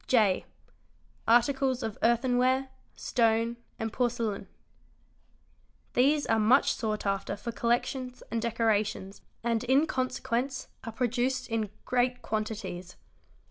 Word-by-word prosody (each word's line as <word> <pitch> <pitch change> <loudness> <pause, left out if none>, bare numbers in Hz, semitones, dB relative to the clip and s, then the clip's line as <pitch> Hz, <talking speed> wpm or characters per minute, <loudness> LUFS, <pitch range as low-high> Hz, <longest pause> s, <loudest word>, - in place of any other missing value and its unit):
J. 215 -7 +3 0.8
Articles 260 +2 +3
of 220 -2 -3
Earthenware, 255 +3 +2 0.3
Stone, 230 0 +1 0.2
and 225 -1 -3
Porcelain. 230 -5 -1 1.5
These 285 +4 +3
are 225 -1 +2
much 240 +6 +4
sought 215 -3 -3
after 195 -1 -1
for 235 +3 -5
collections 250 +2 -1
and 230 - 0
decorations 215 -4 0 0.2
and 230 -1 +1
in 270 +5 +4
consequence 255 -1 -2
are 230 - -5
produced 250 +2 -1
in 225 -2 -1 0.2
great 250 0 +1
quantities. 205 -5 -4
235 Hz, 105 wpm, -29 LUFS, 220-255 Hz, 1.5 s, much